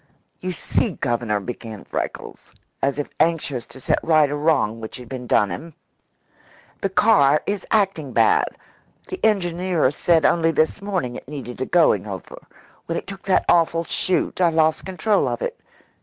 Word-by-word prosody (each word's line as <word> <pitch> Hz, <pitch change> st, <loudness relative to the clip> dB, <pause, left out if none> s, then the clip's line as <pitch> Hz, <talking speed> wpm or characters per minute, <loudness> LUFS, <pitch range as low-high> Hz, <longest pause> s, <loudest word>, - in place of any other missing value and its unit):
"You 185 Hz, -, -3 dB
see, 195 Hz, +3 st, -1 dB
Governor," 120 Hz, -6 st, -1 dB
began 110 Hz, -1 st, -7 dB
Freckles, -, -, -6 dB, 0.3 s
as 140 Hz, +1 st, 0 dB
if 145 Hz, -, -3 dB
anxious 150 Hz, -7 st, 0 dB
to -, -, -14 dB
set -, -, +1 dB
right 155 Hz, -3 st, +3 dB
a -, -, -1 dB
great 145 Hz, -, -3 dB
wrong 115 Hz, -9 st, +2 dB
which 110 Hz, -, -7 dB
had 125 Hz, -1 st, -11 dB
been 125 Hz, 0 st, -7 dB
done 105 Hz, -4 st, +3 dB
him, 165 Hz, -2 st, -7 dB, 1.1 s
"the 195 Hz, -, 0 dB
car 190 Hz, -8 st, +4 dB
is 205 Hz, -1 st, -3 dB
acting 190 Hz, -, +1 dB
bad. 430 Hz, 0 st, +4 dB, 0.6 s
The 375 Hz, -, -7 dB
engineer 180 Hz, -7 st, +1 dB
said 160 Hz, +1 st, +2 dB
only 165 Hz, -1 st, +3 dB
this 160 Hz, +4 st, +1 dB
morning 185 Hz, -12 st, -2 dB
it -, -, -12 dB
needed 130 Hz, -4 st, -7 dB
a 130 Hz, -, -1 dB
going 110 Hz, -, +3 dB
over. 95 Hz, -3 st, -8 dB, 0.5 s
When 170 Hz, -, -2 dB
it -, -, -5 dB
took 195 Hz, -1 st, -9 dB
that 195 Hz, -, +2 dB
awful 165 Hz, -1 st, +3 dB
shoot, 185 Hz, +2 st, -1 dB
I 175 Hz, -, +5 dB
lost 160 Hz, +1 st, +1 dB
control 200 Hz, +3 st, +1 dB
of -, -, -2 dB
it. -, -, -4 dB
160 Hz, 170 wpm, -22 LUFS, 130-185 Hz, 1.1 s, I